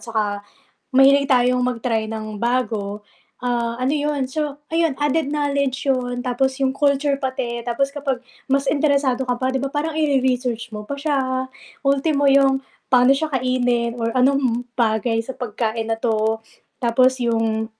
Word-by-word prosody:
saka 210 -3 -1 0.5
mahilig 275 +2 +6
tayong 250 -1 +3
mag-try 230 -2 -1
ng 215 -1 -5
bago, 220 -3 -1 0.4
ah, 240 -2 -1
ano 255 - +1
yun 290 -2 -1
so, 295 0 -3
ayun 330 -2 +1
added 295 0 +1
knowledge 280 -2 -1
'yon 245 -2 0
tapos 260 +2 -1
yung 265 - +3
culture 280 0 +2
pati 260 -3 -3
tapos 250 +3 0
kapag 275 -3 -3 0.3
mas 275 0 +2
interesado 280 -3 +2
ka 250 - 0
pa 260 0 0
'di 265 - 0
ba 275 - -2
parang 310 +2 -2
ire-research 255 -5 0
mo 210 0 -6
pa 280 - -5
siya. 260 -3 -1 0.3
Ultimo 280 +1 +2
yung 270 -1 +4 0.3
pa'no 250 0 +5
siya 310 0 -3
kainin 245 -2 0
or 230 -1 -2
anong 255 -2 +2 0.2
bagay 225 0 +1
sa 265 - -6
pagkain 225 -2 -3
na 225 - 0
'to. 220 -1 0 0.4
Tapos 255 +1 +3
yung 225 -1 0
255 Hz, 150 wpm, -21 LUFS, 235-275 Hz, 0.5 s, mahilig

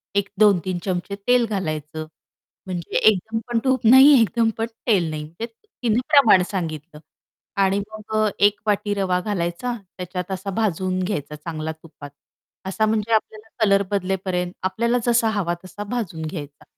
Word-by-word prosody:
एक 200 -1 +1
2-3 185 -4 +3
चमचे 185 +1 -2
तेल 245 -1 +4
घालायचं, 155 -6 -4 0.6
म्हणजे 175 -3 -3
एकदम 220 +2 +2
पण 235 -1 0
तूप 260 -2 +1
नाही 265 +4 +9
एकदम 225 +1 +2
पण 225 - 0 0.2
तेल 180 -8 +3
नाही 155 -1 -4
म्हणजे 170 +9 -7
तिने 240 - -3
प्रमाण 230 -11 +6
सांगितलं. 155 -4 -5 0.6
आणि 195 +1 +2
मग 215 0 -7
अ, 215 -1 +3
1 205 0 +4
वाटी 205 0 +1
रवा 185 -2 0
घालायचा 200 +4 -2 0.2
त्याच्यात 180 +1 -5
असा 190 +1 -4
भाजून 185 -2 0
घ्यायचा 150 -6 -3
चांगला 155 0 -5
तुपात, 155 -2 -12 0.6
असा 215 +3 0
म्हणजे 220 +1 0
आपल्याला 220 0 -1 0.2
कलर 200 0 +4
बदलेपर्यंत 185 -2 -1
आपल्याला 235 +6 +1
जसा 230 -1 +3
हवा 195 -5 -1
तसा 205 +3 -7
भाजून 195 -10 -3
घ्यायचा 145 -3 -7
195 Hz, 150 wpm, -22 LUFS, 175-220 Hz, 0.6 s, नाही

